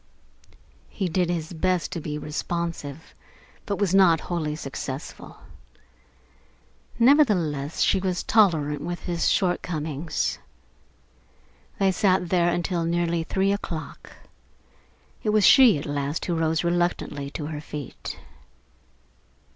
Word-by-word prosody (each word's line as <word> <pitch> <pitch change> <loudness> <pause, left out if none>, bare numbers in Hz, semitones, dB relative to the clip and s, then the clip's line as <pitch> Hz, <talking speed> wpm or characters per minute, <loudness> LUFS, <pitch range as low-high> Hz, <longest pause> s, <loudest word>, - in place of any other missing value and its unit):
He 190 - -3
did 175 +1 0
his 170 -1 -3
best 180 +1 0
to 165 - -4
be 150 0 -4
responsive, 160 -1 -5 0.5
but 200 - 0
he - - -8
was 195 -3 +1
not 180 -5 +5
wholly 155 -4 -3
successful. 135 -1 -7 1.6
Nevertheless, 190 - +3
she 195 - +3
was 185 -1 -2
tolerant 155 -9 +2
with 175 +2 -4
his 175 -2 0
shortcomings. 160 -4 -1 1.4
They 195 -1 +3
sat 185 -2 +1
there 175 -1 +3
until 175 0 -1
nearly 170 0 0
three 195 +3 +1
o'clock. 170 -5 -5 1.1
It 215 - -1
was 210 -1 +4
she 255 - +7
at 145 - -6
last 145 +2 -2
who 175 - -1
rose 160 0 0
reluctantly 170 -5 -1
to 145 +1 -6
her 150 -1 -5
feet. 150 -3 -7
170 Hz, 115 wpm, -25 LUFS, 150-185 Hz, 1.6 s, she